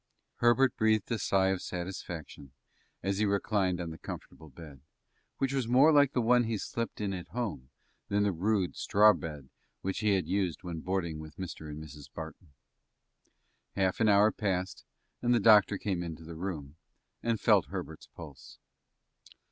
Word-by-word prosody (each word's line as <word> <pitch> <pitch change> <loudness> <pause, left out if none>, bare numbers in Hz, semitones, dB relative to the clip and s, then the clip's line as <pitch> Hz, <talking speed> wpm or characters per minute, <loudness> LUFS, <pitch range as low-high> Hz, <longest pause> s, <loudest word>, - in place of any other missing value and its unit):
Herbert 120 +2 +4
breathed 110 0 +2
a 115 - 0
sigh 95 -1 +2
of 95 -1 -1
satisfaction, 85 -6 -7 0.5
as 100 +1 -1
he 110 - +3
reclined 100 -2 +1
on 85 -2 -4
the 80 - -10
comfortable 80 -1 -9
bed, 70 -1 -12 0.6
which 135 0 0
was 130 -4 -1
more 130 +6 +6
like 145 -2 +5
the 125 - +1
one 120 +1 +4
he 110 -1 -1
slept 115 +3 -4
in 100 -2 -2
at 90 -2 -6
home 105 - -4 0.4
than 105 0 +1
the 100 - +2
rude, 95 +1 0
straw 105 +1 +5
bed 75 -5 -7 0.3
which 95 0 -2
he 105 -2 +3
had 95 - 0
used 95 -6 -1
when 85 -3 -5
boarding 85 -3 -2
with 80 -1 -10
Mr. 85 -4 -7
and 75 +1 -7
Mrs. 75 -1 -12
Barton. 80 -1 -9 1.2
Half 95 -2 +1
an 110 -2 +4
hour 105 +1 +5
passed, 95 -3 -2 0.4
and 120 0 +3
the - - +3
doctor 105 -2 +6
came 95 -4 -2
into 80 -2 -6
the 80 +1 -9
room, 80 -4 -5 0.4
and 115 -2 0
felt - - +4
Herbert's - - -7
pulse. 75 -6 -12
95 Hz, 170 wpm, -30 LUFS, 80-110 Hz, 1.2 s, more